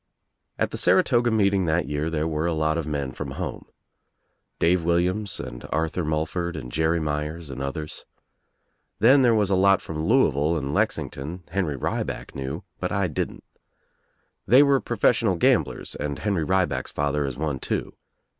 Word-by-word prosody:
At - - 0
the - - -3
Saratoga 120 0 +4
meeting 100 -4 +2
that 80 +1 +1
year 75 +2 -1
there 80 -1 -1
were 80 +1 -1
a 85 - 0
lot 80 0 +1
of 80 -2 -2
men 70 -3 -2
from - - -6
home. - - -5 0.9
Dave 85 +1 +2
Williams 90 +4 0
and - - -7
Arthur 80 +3 -1
Mul 80 0 0
ford 85 0 -3
and 65 -5 -7
Jerry 80 +3 +1
Myers 75 0 -3
and 65 - -6
others. 75 +3 -5 0.9
Then 130 +6 +6
there 120 -3 +4
was 105 -2 +1
a - - +4
lot 95 0 +5
from 80 -1 -5
Louisville 80 - +3
and 70 -1 -3
Lexington 80 +7 -2
Henry 85 -6 -1
Rieback - - -3
knew 65 0 -5 0.2
but - - -2
I 100 -3 0
didn't. 75 - -4 1.0
They 130 +4 +7
were 140 -1 +4
professional 115 -3 +2
gamblers 85 - +1
and 70 -1 -4
Henry 100 -6 -1
Rieback's 90 -9 0
father 75 0 0
Is 65 - -5
one 75 -3 -2
too. - - -3
80 Hz, 165 wpm, -25 LUFS, 75-95 Hz, 1.0 s, They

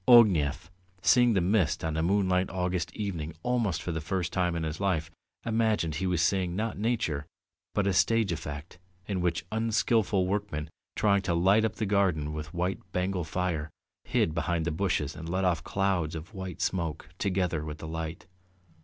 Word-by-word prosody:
Ognev, 90 - +5 0.3
seeing 120 -2 +5
the 95 - +3
mist 95 -2 +2
on 80 -1 -1
a 80 - +1
moonlight 95 +1 +2
August 90 -2 -1
evening 85 -7 -3
almost 120 -9 0
for 90 - -2
the 80 -1 -2
first 90 +1 -2
time 90 -2 +1
in 85 - -2
his 80 0 -3
life, 85 -5 0 0.3
imagined 110 -7 +1
he 95 +5 -1
was 90 -3 +2
seeing, 90 0 +1
not 110 +3 -1
nature, 105 -10 -1 0.5
but 105 - +2
a 100 - +2
stage 115 +1 +3
effect 75 +2 -6 0.3
in 95 -3 -1
which 85 -2 0
unskilful 110 -3 +2
workmen, 90 -6 -2 0.2
trying 100 -2 +3
to 90 -3 0
light 95 +6 +4
up 110 - 0
the 110 - -1
garden 95 -7 +1
with 75 0 -5
white 90 +2 -1
Bengal 90 0 0
fire, 80 -2 -2 0.3
hid 80 - +1
behind 85 0 0
the 85 - 0
bushes 80 -4 0
and 80 +1 -7
let 95 +2 0
off 90 -3 +1
clouds 95 -5 0
of 80 +6 -8
white 95 -2 -6
smoke 80 -6 -2
together 90 -5 0
with 75 -1 -5
the 80 - -7
light. 80 +1 -5
90 Hz, 180 wpm, -29 LUFS, 80-100 Hz, 0.5 s, Ognev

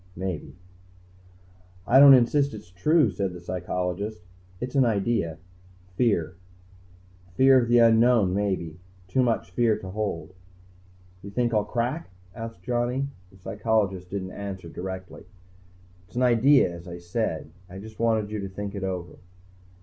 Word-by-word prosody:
"Maybe." 95 -2 -5 1.3
"I 130 +5 +5
don't 140 -1 +10
insist 140 +3 +2
it's 90 - -12
true," 150 - +3
said 95 -2 -3
the 90 - -8
psychologist. 90 +2 -4 0.4
"It's 125 +1 -5
an 135 -2 +4
idea. 105 -7 0 0.6
Fear. 90 -7 +1 1.0
Fear 130 +2 +6
of 120 - -2
the 120 +1 +4
unknown, 115 -4 +5
maybe. 95 -5 -2 0.3
Too 130 +8 +1
much 115 -6 0
fear 110 +2 +2
to 95 -3 -8
hold." 100 -4 -4 0.9
"You 100 - -9
think 120 +3 -1
I'll 105 -1 +2
crack?" 125 +9 -2 0.2
asked 115 -5 -8
Johnny. 125 +4 -1 0.2
The 95 - -19
psychologist 100 -2 -1
didn't 95 -1 -4
answer 95 -4 -7
directly. 95 +1 -7 0.8
"It's - - -23
an 125 - +1
idea, 125 -3 +4
as 85 +1 -11
I 85 0 -7
said. 85 -3 -3 0.2
I 95 - -9
just 110 +2 -11
wanted 110 -2 +1
you 105 - -3
to 100 -1 -5
think 100 +1 -6
it 100 -2 -5
over." 90 -2 -5
105 Hz, 145 wpm, -26 LUFS, 90-120 Hz, 1.3 s, don't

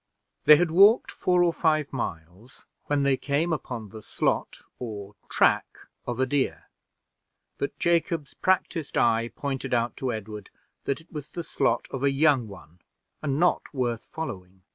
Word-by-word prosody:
They 150 - +10
had 170 +1 +1
walked 200 +7 +6
four 180 -1 +2
or 170 -1 +2
five 155 -4 +1
miles 95 0 -6 0.2
when 145 -1 +1
they 140 -1 +3
came 150 +5 0
upon 120 -7 -5
the 110 +2 -10
slot - - -2 0.2
or 105 -4 -6 0.2
track - - +2 0.3
of 120 0 -3
a 130 - +3
deer, 135 0 -1 0.9
but 140 - -3
Jacob's 170 -3 0
practiced 180 -4 0
eye 115 0 +3
pointed 135 -3 -2
out 120 0 0
to 130 -2 -2
Edward 105 -2 -7 0.4
that 140 +3 -1
it 160 - -23
was 150 -2 -6
the 170 - -5
slot 135 -6 0
of 135 - -4
a 140 - +4
young 135 -4 +3
one, 90 -4 -13 0.4
and 140 -1 -1
not 175 +1 +2
worth 120 -3 -2
following. 95 - -7
135 Hz, 160 wpm, -26 LUFS, 115-155 Hz, 0.9 s, They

